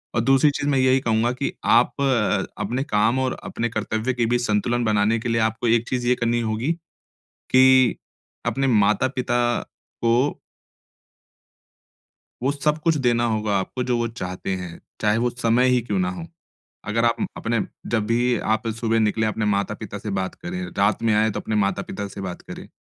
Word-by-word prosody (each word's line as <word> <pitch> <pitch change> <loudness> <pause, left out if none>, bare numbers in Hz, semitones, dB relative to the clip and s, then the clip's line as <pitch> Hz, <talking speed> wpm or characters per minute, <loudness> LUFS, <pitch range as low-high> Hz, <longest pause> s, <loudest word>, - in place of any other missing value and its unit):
और 115 - +2
दूसरी 135 +4 +4
चीज़ 145 0 -2
मैं 135 -2 +2
यही 130 +1 +4
कहूँगा 115 -1 +1
कि 135 +2 -3
आप 120 +2 +4
अ, 130 -6 +1 0.2
अपने 125 +6 -2
काम 110 +2 +1
और 130 -1 -1
अपने 120 0 -3
कर्तव्य 110 +3 -2
के 120 -1 0
बीच 120 +1 +1
संतुलन 120 +3 +1
बनाने 110 +1 +2
के 115 - -4
लिए 115 0 +1
आपको 110 +2 0
एक 115 +1 +2
चीज़ 125 -2 -1
ये 125 - +4
करनी 120 -1 0
होगी, 115 +7 -1 0.6
कि 130 -1 +4 0.5
अपने 135 0 0
माता-पिता 120 +2 +2 0.6
को 120 +5 +2 2.0
वो 135 - +2
सब 150 +2 0
कुछ 165 -2 +3
देना 120 0 +3
होगा 105 -2 0
आपको 125 +7 -3
जो 125 - +2
वो 120 - 0
चाहते 90 +1 -4
हैं, 90 -2 -8 0.2
चाहे 105 +1 +2
वो - - +3
समय 120 +1 +2
ही 125 - +3
क्यों 125 - -2
ना 185 -1 +1
हो? 175 -3 -6 0.7
अगर 115 +2 +1
आप 115 0 +3
उम, - - -1
अपने 115 -1 -1 0.3
जब 110 -3 0
भी 120 +2 +1 0.2
आप 110 +1 -4
सुबह 115 -1 +1
निकले 110 0 +1
अपने 110 +1 -1
माता-पिता 100 +1 -3
से 105 0 -6
बात 95 0 -3
करें, 180 +2 -6 0.2
रात 100 +3 +2
में - - +4
आए 110 +1 +3
तो - - -1
अपने 110 - -4
माता-पिता 100 0 -3
से 100 - -7
बात 90 -2 -6
करें। - - -9
115 Hz, 185 wpm, -23 LUFS, 110-130 Hz, 2.0 s, दूसरी